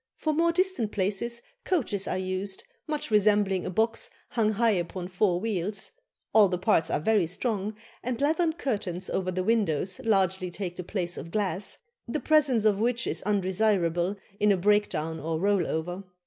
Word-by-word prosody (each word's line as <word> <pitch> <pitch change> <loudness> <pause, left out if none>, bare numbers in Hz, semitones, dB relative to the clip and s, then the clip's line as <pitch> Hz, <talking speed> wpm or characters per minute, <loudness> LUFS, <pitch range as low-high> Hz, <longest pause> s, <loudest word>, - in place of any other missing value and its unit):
For 310 - 0
more 335 +2 +3
distant 365 - +1
places 210 +5 0 0.2
coaches 225 - 0
are - - -1
used, 185 +1 -3 0.2
much 300 -6 -3
resembling 205 -3 +3
a - - -2
box 220 +5 +1 0.2
hung 220 -3 +1
high 230 +2 +3
upon 180 -1 -3
four 180 -1 +1
wheels; 200 -1 -2 0.4
all 215 -2 +7
the 180 -1 -1
parts 180 -3 +2
are - - +1
very 205 +1 +2
strong, 210 +2 -2 0.3
and 245 -1 -3
leathern 320 +3 +2
curtains 200 - -3
over 185 -1 -1
the 185 0 -1
windows 195 - +1
largely 190 -4 +1
take 180 0 -5
the 180 - -5
place 175 -1 -3
of 165 - -8
glass, 195 0 -1 0.3
the 270 +6 -2
presence 275 -9 +3
of 205 -2 +3
which 235 +1 +1
is - - -2
undesirable 190 -2 +1 0.2
in 210 0 +4
a 195 - +3
break 205 +3 +3
down 160 +1 -3
or 160 0 -2
roll 200 -1 +2
over. 175 +4 -3
200 Hz, 175 wpm, -27 LUFS, 185-225 Hz, 0.4 s, all